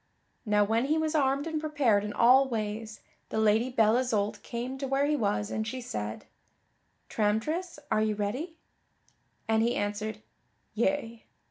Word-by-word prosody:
Now 210 Hz, 0 st, +4 dB
when 225 Hz, +4 st, +1 dB
he 305 Hz, +3 st, +1 dB
was 315 Hz, 0 st, 0 dB
armed 280 Hz, -1 st, +2 dB
and 320 Hz, -2 st, -2 dB
prepared 280 Hz, -10 st, +2 dB
in 210 Hz, -, -4 dB
all 255 Hz, +5 st, +5 dB
ways, 215 Hz, -1 st, -4 dB, 0.3 s
the -, -, -3 dB
Lady 220 Hz, +3 st, +3 dB
Belle 225 Hz, -2 st, +3 dB
Isoult 220 Hz, -5 st, 0 dB
came 250 Hz, +3 st, -5 dB
to 275 Hz, -, -3 dB
where 270 Hz, +1 st, +1 dB
he 300 Hz, +1 st, +1 dB
was 205 Hz, -4 st, -1 dB
and 220 Hz, 0 st, -2 dB
she 255 Hz, +3 st, -4 dB
said, 105 Hz, -, -5 dB, 0.8 s
"Tramtris, 295 Hz, -, -1 dB
are 215 Hz, -, +3 dB
you 215 Hz, -1 st, +1 dB
ready?" 250 Hz, -, -3 dB, 0.9 s
And 220 Hz, 0 st, +3 dB
he 235 Hz, +1 st, +1 dB
answered 210 Hz, +1 st, -3 dB, 0.5 s
"Yea." 235 Hz, -1 st, -1 dB
230 Hz, 155 wpm, -29 LUFS, 210-275 Hz, 0.9 s, all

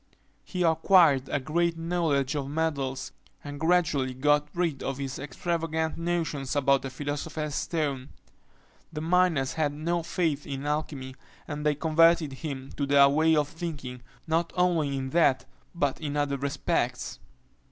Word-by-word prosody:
He 180 Hz, -2 st, -2 dB
acquired 160 Hz, -4 st, +4 dB
a 145 Hz, -, 0 dB
great 165 Hz, +4 st, 0 dB
knowledge 165 Hz, -5 st, 0 dB
of 140 Hz, -2 st, -3 dB
metals, 140 Hz, -4 st, -2 dB, 0.3 s
and 145 Hz, 0 st, -7 dB
gradually 160 Hz, -6 st, +1 dB
got 145 Hz, +2 st, +2 dB
rid 170 Hz, -6 st, -1 dB
of 135 Hz, -1 st, -3 dB
his 135 Hz, -2 st, -5 dB
extravagant 160 Hz, +3 st, -2 dB
notions 165 Hz, -6 st, -2 dB
about 140 Hz, -1 st, +3 dB
the 135 Hz, -, -5 dB
philosopher's 145 Hz, +2 st, -4 dB
stone. 145 Hz, -5 st, -2 dB, 0.8 s
The 155 Hz, -, -5 dB
miners 165 Hz, -5 st, +2 dB
had 150 Hz, -2 st, 0 dB
no 170 Hz, +3 st, -1 dB
faith 160 Hz, -3 st, -1 dB
in 135 Hz, 0 st, -5 dB
alchymy; 145 Hz, -3 st, -3 dB, 0.3 s
and 150 Hz, -1 st, -5 dB
they 150 Hz, -1 st, +2 dB
converted 160 Hz, -1 st, +3 dB
him 135 Hz, -2 st, -6 dB
to 140 Hz, -, -1 dB
their 140 Hz, 0 st, +6 dB
way 160 Hz, +3 st, +3 dB
of 150 Hz, -2 st, +2 dB
thinking, 145 Hz, -7 st, -6 dB, 0.2 s
not 165 Hz, +1 st, 0 dB
only 165 Hz, -6 st, +1 dB
in 130 Hz, 0 st, -4 dB
that 150 Hz, -5 st, +3 dB, 0.3 s
but 145 Hz, -4 st, -1 dB
in 150 Hz, -1 st, -3 dB
other 145 Hz, -1 st, 0 dB
respects. 140 Hz, +1 st, -2 dB
150 Hz, 145 wpm, -27 LUFS, 140-165 Hz, 0.8 s, their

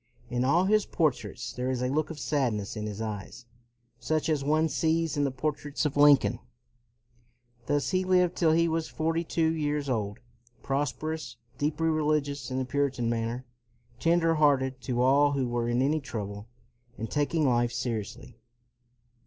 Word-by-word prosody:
In 125 Hz, 0 st, 0 dB
all 165 Hz, +8 st, +3 dB
his 210 Hz, +1 st, +2 dB
portraits 125 Hz, -6 st, -1 dB
there 125 Hz, +1 st, -2 dB
is 125 Hz, -1 st, -1 dB
a -, -, +1 dB
look 155 Hz, +3 st, 0 dB
of 160 Hz, -, -7 dB
sadness 125 Hz, -9 st, -1 dB
in 105 Hz, 0 st, -4 dB
his 105 Hz, +1 st, -5 dB
eyes, 105 Hz, +2 st, -6 dB, 0.5 s
such 155 Hz, 0 st, -1 dB
as 150 Hz, -3 st, +1 dB
one 155 Hz, +3 st, +2 dB
sees 160 Hz, +3 st, 0 dB
in 145 Hz, -1 st, +1 dB
the -, -, +1 dB
portraits 145 Hz, +3 st, -3 dB
of 150 Hz, -, -1 dB
Lincoln. 145 Hz, -6 st, +5 dB, 1.3 s
Thus 145 Hz, +2 st, 0 dB
he 185 Hz, 0 st, +1 dB
lived 180 Hz, -1 st, +3 dB
till 165 Hz, -3 st, +3 dB
he 170 Hz, +1 st, +3 dB
was 160 Hz, 0 st, -1 dB
forty 165 Hz, +1 st, -1 dB
two 160 Hz, -1 st, +1 dB
years 150 Hz, -2 st, -1 dB
old, 105 Hz, -4 st, -2 dB, 0.5 s
prosperous, 145 Hz, 0 st, -3 dB, 0.2 s
deeply 155 Hz, +2 st, 0 dB
religious 150 Hz, -3 st, 0 dB
in 130 Hz, -, -3 dB
the 130 Hz, -, -1 dB
Puritan 135 Hz, -3 st, 0 dB
manner, 115 Hz, +2 st, -2 dB, 0.5 s
tender 165 Hz, 0 st, +3 dB
hearted 135 Hz, -4 st, +2 dB
to 125 Hz, -1 st, 0 dB
all 145 Hz, +2 st, +4 dB
who 135 Hz, -3 st, 0 dB
were 120 Hz, 0 st, -1 dB
in 120 Hz, +2 st, +2 dB
any 150 Hz, +3 st, +2 dB
trouble, 105 Hz, -6 st, -6 dB, 0.5 s
and 115 Hz, -, -4 dB
taking 150 Hz, +1 st, +1 dB
life 120 Hz, -1 st, +2 dB
seri 115 Hz, -2 st, -2 dB
ously. 100 Hz, -, -12 dB
145 Hz, 165 wpm, -28 LUFS, 125-155 Hz, 1.3 s, Lincoln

